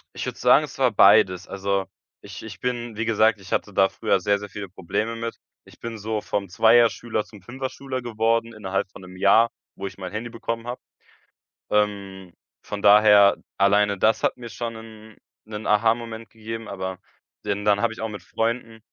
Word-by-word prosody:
Ich - - -4
würde - - -5
sagen, - - +5
es - - -8
war - - +3
beides. 90 +1 +5
Also, 100 0 -1 0.4
ich - - -10
ich 105 -3 -9
bin 120 -2 -3
wie 110 +2 -2
gesagt, 110 -1 +3
ich 90 - -13
hatte 100 - -1
da 95 0 +4
früher - - 0
sehr, 100 +2 +1
sehr 105 0 -8
viele 100 -2 -7
Probleme 100 +5 -3
mit. 115 0 -4 0.3
Ich - - -18
bin 115 -1 -6
so 105 0 -3
vom 100 -2 -3
Zweier-Schüler 115 +1 +3
zum 105 -3 -15
Fünfer-Schüler 130 +4 -5
geworden 115 0 0
innerhalb 95 -2 -3
von - - -13
1 90 0 -12
Jahr, 110 +5 +5 0.3
wo 100 - -5
ich - - -10
mein 95 -1 -6
Handy 110 +3 -5
bekommen 115 0 -5
habe. 125 +1 -5 0.9
Ähm, 100 -3 -1 0.3
von 100 - -5
daher, 105 -1 +7 0.2
alleine 100 0 +3
das 110 +3 +2
hat - - +1
mir 120 -1 -8
schon 115 0 -5
'nen 110 -1 -12 0.3
'nen 110 0 -6
Aha-Moment 115 +1 +1
gegeben, 115 0 -7
aber 95 -1 -5 0.5
den 100 0 -2
dann 100 -1 +3
habe 115 -1 +1
ich 110 - -10
auch 110 - -2
mit 100 -3 -8
Freunden 115 +1 -3
105 Hz, 185 wpm, -24 LUFS, 100-115 Hz, 0.9 s, daher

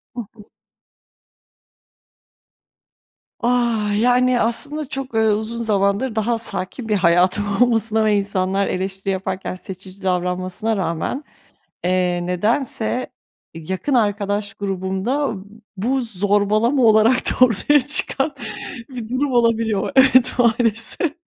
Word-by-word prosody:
Hı 245 - -3
hı. 210 -3 -15 3.0
Ah! 240 -2 +1 0.2
Yani, 250 +1 +3
aslında 290 +7 -2
çok, 270 -3 -5
eee, - - +3
uzun 220 +2 0
zamandır 210 +3 0
daha 225 +2 0
sakin 225 +1 -5
bir 210 - +2
hayatım 185 +2 +3 0.2
olmasına 225 -2 +2
ve 210 - +3
insanlar 195 -1 0
eleştiri 190 +1 -3
yaparken 190 0 -4
seçici 190 +1 -11
davranmasına 185 +3 -1
rağmen, 185 - -2 0.6
eee, 180 -1 0
nedense 225 +6 -1 0.4
yakın 185 - -3
arkadaş 205 -2 0
grubumda 195 +7 -2 0.4
bu 255 +7 0
zorbalama 215 +4 +1
olarak 220 +2 +5
da 255 - +5
ortaya 255 +5 +3
çıkan 290 +1 +1 0.6
bir 245 -5 -7
durum 260 +3 -1
olabiliyor. 230 -3 +1
Evet, 260 -1 +5
maalesef. 235 - +1
220 Hz, 105 wpm, -20 LUFS, 190-245 Hz, 3.0 s, olarak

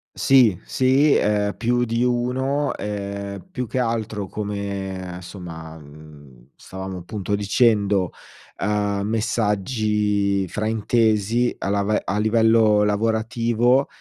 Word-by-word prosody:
Sì, 125 -9 +4
sì, 135 +3 +3
ehm, 105 -1 +1
più 120 +1 +1
di 115 +1 0
uno, 130 +4 0
ehm, 100 - -5
più 125 -8 -4
che 130 - -3
altro 110 -4 -2
come 100 -3 -5
somma, 80 -4 -9
mhmm, 70 -4 -15
stavamo 95 -1 -7
appunto 100 +2 -5
dicendo, 100 -3 +2 0.5
uhm, 105 -1 0
messaggi 105 -2 0
fraintesi 110 +2 +1
a - - -3
lave 100 +1 +1
a 100 +3 -1
livello 110 -1 +4
lavorativo, 115 +4 +1
105 Hz, 105 wpm, -22 LUFS, 100-115 Hz, 0.5 s, Sì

